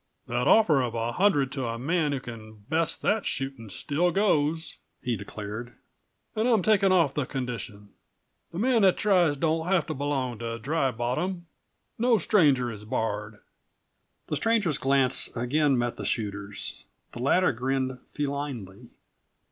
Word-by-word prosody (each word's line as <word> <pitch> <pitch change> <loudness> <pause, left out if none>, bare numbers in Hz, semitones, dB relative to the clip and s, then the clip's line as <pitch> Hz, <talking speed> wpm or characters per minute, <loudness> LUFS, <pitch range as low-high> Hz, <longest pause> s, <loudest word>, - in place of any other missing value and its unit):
"That 120 +3 -1
offer 165 -11 +5
of 120 -2 -2
a 115 +1 -1
hundred 145 -6 +2
to 135 - -5
the 115 -2 -2
man 155 +4 0
who 140 - -1
can 110 -3 -11
beat 160 0 +1
that 215 0 +2
shootin' 135 -5 -3
still 155 - 0
goes," 160 -4 +1 0.2
he 120 -2 -1
declared. 105 +4 -7 0.6
"An' 220 +2 +1
I'm 225 -6 +3
taking 200 -2 +4
off 170 -7 +3
the 145 -4 -2
condition. 115 -6 -5 0.6
The 170 - -7
man 235 +2 +3
that 190 -2 +5
tries 180 -8 +3
don't 160 +2 0
have 180 -5 +2
to - - -3
belong 135 -4 -2
to 115 0 -4
Dry 135 +4 0
Bottom. 155 +10 -2 0.5
No 240 0 +4
stranger 145 - +3
is 105 -1 -8
barred!" 105 -2 -3 0.8
The - - -2
stranger's 210 -10 +1
glance 135 -1 +2
again 135 +3 +2
met 120 0 -1
the 100 - -5
shooter's. 105 -2 -3 0.3
The - - -9
latter 175 +8 +3
grinned 130 +1 -2
felinely. 135 -7 -4
135 Hz, 150 wpm, -27 LUFS, 120-165 Hz, 0.8 s, offer